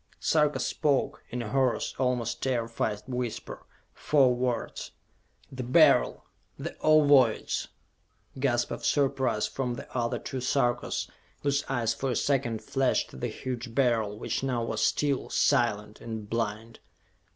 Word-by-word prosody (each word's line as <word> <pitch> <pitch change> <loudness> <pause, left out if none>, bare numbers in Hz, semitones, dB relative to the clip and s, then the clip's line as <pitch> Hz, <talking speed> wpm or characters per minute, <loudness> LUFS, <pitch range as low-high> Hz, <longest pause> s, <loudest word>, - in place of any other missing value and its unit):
Sarka 150 -2 +2
spoke, 145 -3 0
in 125 0 -3
a 105 - -6
hoarse, 130 -1 +1
almost 125 -3 0
terrified 115 -4 -1
whisper, 125 -3 -5 0.3
four 135 -4 +3
words: 125 -1 -2 0.6
"The 130 -1 -5
Beryl! 120 - +4 0.3
The - - -6
Ovoids!" 145 -7 +4 0.7
Gasps 120 -3 +1
of - - -5
surprise 135 -6 +1
from 125 -3 -3
the - - -10
other 120 -2 0
two 130 - -5
Sarkas, 120 -1 0 0.4
whose 140 0 +1
eyes 115 -4 0
for 135 - -3
a 125 - 0
second 125 -4 0
flashed 135 -1 0
to - - -12
the - - -2
huge 125 -2 -6
Beryl, 115 -6 +1
which - - -2
now 125 -3 -1
was 115 - -2
still, 140 -3 +1
silent 105 -2 +1
and 110 -2 -6
blind. 115 0 -3
125 Hz, 135 wpm, -28 LUFS, 115-135 Hz, 0.7 s, Beryl